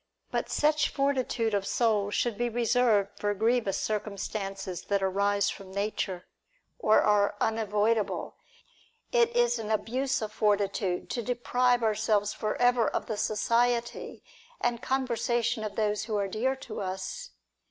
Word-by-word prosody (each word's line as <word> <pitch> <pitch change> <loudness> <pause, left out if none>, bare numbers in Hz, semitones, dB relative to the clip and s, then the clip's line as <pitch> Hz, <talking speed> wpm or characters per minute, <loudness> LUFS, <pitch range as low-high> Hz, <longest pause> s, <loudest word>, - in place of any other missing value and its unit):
But - - -2
such 300 0 +2
fortitude 260 -5 0
of 200 -1 0
soul 215 -4 +1
should 230 +2 0
be 240 +3 -1
reserved 230 -3 +2
for 205 0 0
grievous 220 -2 +1
circumstances 195 -3 -4
that 200 -1 0
arise 200 +1 +1
from 195 -2 -10
nature, 200 -2 -2 0.5
or 220 - +4
are 205 -1 +3
unavoidable; 220 0 0 0.8
it 475 -2 +4
is 485 0 +3
an 215 - -5
abuse 255 +5 0
of 215 - -4
forti 205 -2 +2
tude 185 -3 -3
to 240 - -1
deprive 245 +1 +1
ourselves 215 -1 +1
for 215 - -2
ever 245 -2 +4
of - - -2
the 220 - -3
society 235 +3 0 0.4
and 240 -1 -1
conversation 240 -3 0
of 210 -2 -5
those 210 -1 0
who 220 -1 -3
are 200 -1 0
dear 240 +7 0
to 265 - -7
us. 190 - -5
220 Hz, 140 wpm, -28 LUFS, 205-245 Hz, 0.8 s, or